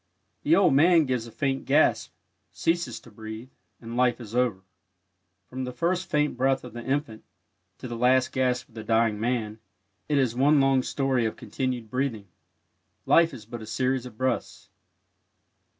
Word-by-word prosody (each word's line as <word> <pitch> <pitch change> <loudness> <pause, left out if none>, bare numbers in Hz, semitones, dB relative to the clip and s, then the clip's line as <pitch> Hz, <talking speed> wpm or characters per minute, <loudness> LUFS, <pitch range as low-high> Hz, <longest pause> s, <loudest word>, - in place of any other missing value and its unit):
The 160 - +4
old 180 -6 +4
man 165 +3 +5
gives 125 -3 -2
a - - -11
faint 135 +2 -2
gasp, 145 +3 +2 0.4
ceases 170 +1 -1
to 120 - -16
breathe, 110 +4 -9 0.3
and 115 0 -8
life 125 0 +2
is 115 -3 -10
over. 120 -7 +1 0.8
From 130 +1 -5
the 125 - -4
first 175 +8 -1
faint 150 -1 +1
breath 135 +1 +1
of 125 - -10
the 120 0 -7
infant 130 -5 -2 0.5
to - - -8
the 120 - -5
last 125 +2 +3
gasp 125 -2 0
of - - -24
the 110 -1 -7
dying 110 -1 +1
man, 110 -2 -2 0.5
it 145 - +2
is 130 -4 +2
one 145 +3 +4
long 135 -1 +3
story 130 -3 0
of 110 - -5
continued 125 -4 -4
breathing. 125 -6 -2 0.8
Life 165 0 +5
is 105 - -10
but 115 +1 -8
a 110 - -9
series 125 +2 -1
of 110 - -14
breaths. 130 +1 -3
125 Hz, 170 wpm, -26 LUFS, 115-135 Hz, 0.8 s, man